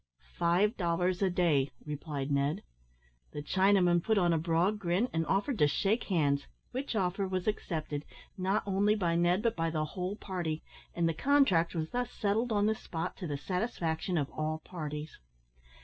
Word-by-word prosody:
"Five 180 +7 +2
dollars 180 +1 0
a 195 - +3
day," 160 -7 +2 0.2
replied 145 -2 -4
Ned. 140 +2 +1 0.7
The 145 - -5
Chinaman 185 0 +4
put 220 +4 +1
on 175 -3 +3
a 165 - +2
broad 170 +6 +1
grin, 185 +5 +1
and 165 -1 0
offered 210 +6 0
to 150 - +6
shake 200 - +1
hands, 145 -7 +1 0.2
which 260 -1 -3
offer 195 0 0
was 185 -1 -2
accepted, 155 -8 -2 0.3
not 190 +3 0
only 200 +2 +2
by 175 -5 +1
Ned, 175 +4 +2
but 230 -1 +1
by 165 -1 0
the 155 -1 -1
whole 180 +5 -4
party; 175 -6 -3 0.3
and 170 -1 +2
the 165 - +1
contract 185 - +3
was 160 -1 -2
thus 245 -1 -1
settled 220 +4 0
on 205 -1 +2
the 215 - +3
spot, 170 -4 -5
to 180 - -5
the 145 -2 -2
satisfaction 180 0 -2
of 145 -3 -1
all 155 0 -2
parties. 150 -3 -6
175 Hz, 175 wpm, -31 LUFS, 160-200 Hz, 0.7 s, to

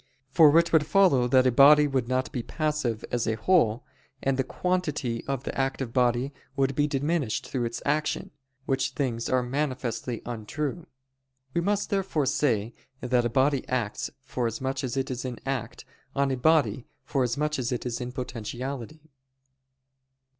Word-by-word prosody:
For 155 0 +7
it 170 0 +3
would 155 -2 +4
follow 175 -11 +4
that 130 +1 +4
a 130 - +4
body 145 +4 +7
would 135 -4 -1
not 130 +1 -1
be 125 - -3
passive 150 -6 -2
as 120 -1 0
a 110 - +1
whole, 120 -3 +2 0.4
and 135 0 +2
the 130 - +1
quantity 150 -7 -2
of 135 -2 -3
the - - -5
active 135 -2 -2
body 125 +2 +1 0.2
would 135 -1 +1
be 145 +2 +1
diminished 145 -3 -1
through 125 -3 -2
its 115 - -5
action; 155 +6 -1 0.3
which 135 0 0
things 120 -6 -2
are 130 -1 +2
manifestly 130 -3 -3
untrue. 130 +8 -4 0.7
We 170 - +1
must 205 +3 0
therefore 190 -7 0
say 120 -5 +1 0.3
that 125 -1 +1
a - - +1
body 135 +3 +2
acts 120 -5 -2
forasmuch 130 +2 -2
as 130 0 -3
it 135 +1 -1
is 125 -1 -4
in 125 -2 -4
act, 130 -4 -4 0.3
on 140 -1 +2
a - - +1
body 130 -5 +2 0.2
forasmuch 140 +3 0
as 125 0 -2
it 125 - -3
is 125 0 -3
in 125 0 -4
potentiality. 125 +3 -6
130 Hz, 160 wpm, -27 LUFS, 120-150 Hz, 0.7 s, For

